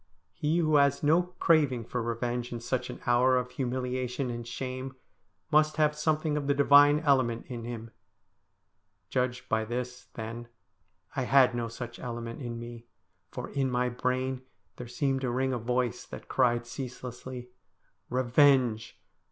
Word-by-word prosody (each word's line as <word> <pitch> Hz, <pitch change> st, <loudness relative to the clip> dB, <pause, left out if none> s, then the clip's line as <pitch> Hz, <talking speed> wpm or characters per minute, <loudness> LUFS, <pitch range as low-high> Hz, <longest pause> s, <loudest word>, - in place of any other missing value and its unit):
He 155 Hz, +3 st, 0 dB
who 155 Hz, -3 st, +3 dB
has 140 Hz, 0 st, +3 dB
no 160 Hz, +4 st, +5 dB, 0.2 s
craving 145 Hz, -7 st, +3 dB
for 125 Hz, +1 st, -3 dB
revenge 120 Hz, +1 st, -2 dB
in 120 Hz, -, -4 dB
such 125 Hz, +2 st, -2 dB
an -, -, -7 dB
hour 125 Hz, +2 st, +4 dB
of 125 Hz, 0 st, -2 dB
humiliation 125 Hz, 0 st, -2 dB
and 120 Hz, 0 st, -6 dB
shame 130 Hz, +1 st, -5 dB, 0.6 s
must 155 Hz, 0 st, +3 dB
have 150 Hz, -1 st, +3 dB
something 155 Hz, 0 st, 0 dB
of 145 Hz, -2 st, -2 dB
the 140 Hz, -, +2 dB
divine 145 Hz, +1 st, +6 dB
element 130 Hz, -6 st, +2 dB
in 120 Hz, -2 st, -7 dB
him. 115 Hz, -1 st, -6 dB, 1.2 s
Judged 125 Hz, -1 st, -1 dB
by 110 Hz, 0 st, +1 dB
this, 125 Hz, +2 st, -5 dB
then, 115 Hz, +1 st, -6 dB, 0.7 s
I 130 Hz, -, -1 dB
had 130 Hz, -1 st, +5 dB
no 120 Hz, -1 st, -2 dB
such 120 Hz, +1 st, -8 dB
element 115 Hz, +1 st, -6 dB
in 120 Hz, -2 st, -5 dB
me, 120 Hz, 0 st, -9 dB, 0.4 s
for 125 Hz, -, -6 dB
in 135 Hz, -2 st, 0 dB
my 125 Hz, 0 st, +1 dB
brain 130 Hz, +1 st, -1 dB, 0.4 s
there 125 Hz, -, -7 dB
seemed 135 Hz, +2 st, -1 dB
to 130 Hz, -, -1 dB
ring 130 Hz, +2 st, 0 dB
a 125 Hz, -, -1 dB
voice 125 Hz, 0 st, -1 dB
that -, -, -9 dB
cried 120 Hz, -1 st, +2 dB
ceaselessly, 125 Hz, -1 st, -7 dB, 0.3 s
' -, -, -44 dB
Revenge 125 Hz, -2 st, +3 dB
125 Hz, 155 wpm, -29 LUFS, 120-135 Hz, 1.2 s, divine